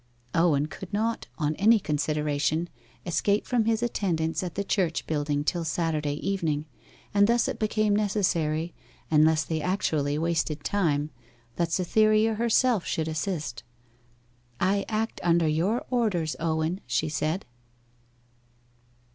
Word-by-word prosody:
Owen 160 Hz, -4 st, +3 dB
could 180 Hz, +4 st, -9 dB
not, 225 Hz, +2 st, -1 dB
on 150 Hz, -1 st, 0 dB
any 220 Hz, +3 st, +5 dB
consideration, 150 Hz, +1 st, -1 dB, 0.4 s
escape 200 Hz, +5 st, +1 dB
from 240 Hz, -3 st, +1 dB
his 225 Hz, +1 st, +1 dB
attendance 170 Hz, -8 st, -1 dB
at 180 Hz, -3 st, -5 dB
the 200 Hz, -, -1 dB
church 180 Hz, -5 st, 0 dB
building 145 Hz, -1 st, -1 dB
till 170 Hz, +3 st, -1 dB
Saturday 155 Hz, -2 st, -1 dB
evening; 160 Hz, -7 st, -1 dB, 0.5 s
and 205 Hz, 0 st, +5 dB
thus 235 Hz, +1 st, +3 dB
it -, -, -4 dB
became 215 Hz, -1 st, +1 dB
necessary, 175 Hz, -6 st, 0 dB, 0.4 s
unless 155 Hz, 0 st, +4 dB
they 160 Hz, 0 st, -2 dB
actually 150 Hz, -6 st, 0 dB
wasted 160 Hz, -2 st, -1 dB
time, 155 Hz, -7 st, 0 dB, 0.5 s
that 170 Hz, -1 st, 0 dB
Cytherea 215 Hz, +5 st, +3 dB
herself 235 Hz, -1 st, +2 dB
should 160 Hz, -1 st, -2 dB
assist. 155 Hz, -4 st, -3 dB, 1.0 s
'I 195 Hz, +2 st, +1 dB
act 220 Hz, +1 st, -2 dB
under 170 Hz, -1 st, +3 dB
your 175 Hz, +10 st, 0 dB
orders, 195 Hz, -11 st, 0 dB
Owen,' 165 Hz, +3 st, -1 dB
she -, -, 0 dB
said. 155 Hz, +4 st, -2 dB
170 Hz, 125 wpm, -27 LUFS, 155-205 Hz, 1.0 s, any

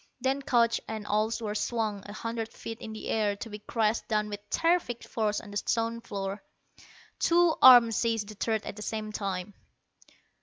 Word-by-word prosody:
Then 265 Hz, +2 st, 0 dB
couch 235 Hz, -3 st, +2 dB
and 220 Hz, -1 st, -5 dB
all 215 Hz, +2 st, +1 dB
were 210 Hz, -2 st, -3 dB
swung 215 Hz, -2 st, -1 dB
a 205 Hz, -, -8 dB
hundred 230 Hz, +1 st, -4 dB
feet 225 Hz, 0 st, -8 dB
in 220 Hz, -, -7 dB
the 220 Hz, -, -7 dB
air 210 Hz, -2 st, +1 dB
to 225 Hz, -, -8 dB
be 210 Hz, -, -7 dB
crashed 220 Hz, +1 st, 0 dB
down 210 Hz, -2 st, 0 dB
with 205 Hz, -1 st, -5 dB
terrific 330 Hz, -, +1 dB
force 215 Hz, -2 st, -1 dB
on 205 Hz, -, -11 dB
the 205 Hz, -, -3 dB
stone 230 Hz, +2 st, -1 dB
floor. 200 Hz, -2 st, -5 dB, 0.8 s
Two 345 Hz, -1 st, +4 dB
arms 240 Hz, -3 st, +9 dB
seized 225 Hz, -3 st, 0 dB
the -, -, -7 dB
third 220 Hz, +1 st, -1 dB
at -, -, -6 dB
the 210 Hz, -, -9 dB
same 215 Hz, 0 st, -4 dB
time.... 195 Hz, -1 st, -4 dB
220 Hz, 185 wpm, -29 LUFS, 210-230 Hz, 0.8 s, arms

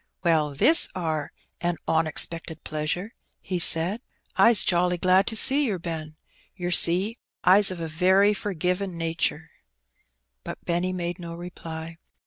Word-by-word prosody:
'* -, -, -52 dB
Well, 155 Hz, -4 st, +1 dB
this 320 Hz, -, +5 dB
are 160 Hz, -4 st, -3 dB, 0.3 s
a 175 Hz, 0 st, -1 dB
onexpected 160 Hz, +1 st, +1 dB
pleasure! 155 Hz, +7 st, -4 dB, 0.2 s
" -, -, -48 dB
he 180 Hz, -2 st, -4 dB
said. 175 Hz, +6 st, +2 dB, 0.2 s
*' -, -, -41 dB
Ps 230 Hz, -3 st, +5 dB
jolly 180 Hz, 0 st, +1 dB
glad 185 Hz, +3 st, +2 dB
to 225 Hz, -, -3 dB
see 275 Hz, +5 st, +3 dB
yer, 200 Hz, -5 st, -2 dB
Ben. 160 Hz, -3 st, -7 dB, 0.4 s
Ter 175 Hz, 0 st, -4 dB
see, 185 Hz, +7 st, +3 dB, 0.3 s
Ps 195 Hz, +2 st, +6 dB
of 185 Hz, -2 st, -6 dB
a 165 Hz, -, -4 dB
very 190 Hz, +6 st, +2 dB
forgivin* 185 Hz, -1 st, -3 dB
natur^.'^ 165 Hz, -1 st, -2 dB, 0.9 s
But -, -, -9 dB
Benny 175 Hz, +2 st, -1 dB
made 175 Hz, 0 st, -5 dB
no 170 Hz, -1 st, -8 dB
reply. 165 Hz, -2 st, -9 dB
175 Hz, 150 wpm, -24 LUFS, 165-190 Hz, 0.9 s, Ps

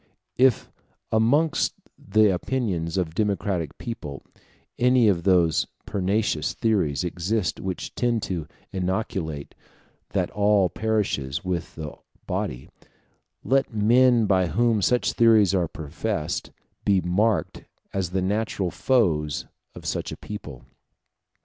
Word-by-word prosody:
If 130 Hz, -1 st, +3 dB, 0.4 s
amongst 135 Hz, +9 st, +2 dB, 0.2 s
the 110 Hz, -2 st, +3 dB
opinions 90 Hz, -6 st, -2 dB
of 90 Hz, -3 st, 0 dB
a -, -, -17 dB
democratic 95 Hz, -5 st, -1 dB
people 75 Hz, -, -6 dB, 0.6 s
any 125 Hz, -1 st, +5 dB
of 95 Hz, -5 st, +3 dB
those 90 Hz, -4 st, +3 dB, 0.2 s
pernicious 100 Hz, -4 st, 0 dB
theories 95 Hz, -, +1 dB
exist 90 Hz, +3 st, -1 dB
which 95 Hz, -1 st, -4 dB
tend 120 Hz, -3 st, 0 dB
to 85 Hz, -5 st, -3 dB, 0.3 s
inculcate 90 Hz, -5 st, -3 dB, 0.6 s
that -, -, 0 dB
all 100 Hz, -2 st, +3 dB
perishes 100 Hz, -12 st, -1 dB
with 90 Hz, -2 st, -3 dB
the 75 Hz, -2 st, -6 dB, 0.3 s
body, 65 Hz, +1 st, -3 dB, 0.8 s
let 135 Hz, -3 st, +1 dB
men 120 Hz, +2 st, +4 dB
by 95 Hz, -3 st, +3 dB
whom 115 Hz, +5 st, +2 dB
such 125 Hz, +5 st, +2 dB
theories 110 Hz, -5 st, +5 dB
are 90 Hz, -3 st, +2 dB
professed 80 Hz, +3 st, -3 dB, 0.3 s
be 100 Hz, -2 st, +3 dB
marked 100 Hz, +5 st, 0 dB, 0.3 s
as 95 Hz, -3 st, -1 dB
the 95 Hz, +1 st, -1 dB
natural 100 Hz, -2 st, -1 dB
foes 80 Hz, -, +1 dB, 0.3 s
of -, -, -10 dB
such -, -, -2 dB
a -, -, -6 dB
people. 75 Hz, -12 st, -8 dB
95 Hz, 120 wpm, -25 LUFS, 85-110 Hz, 0.8 s, any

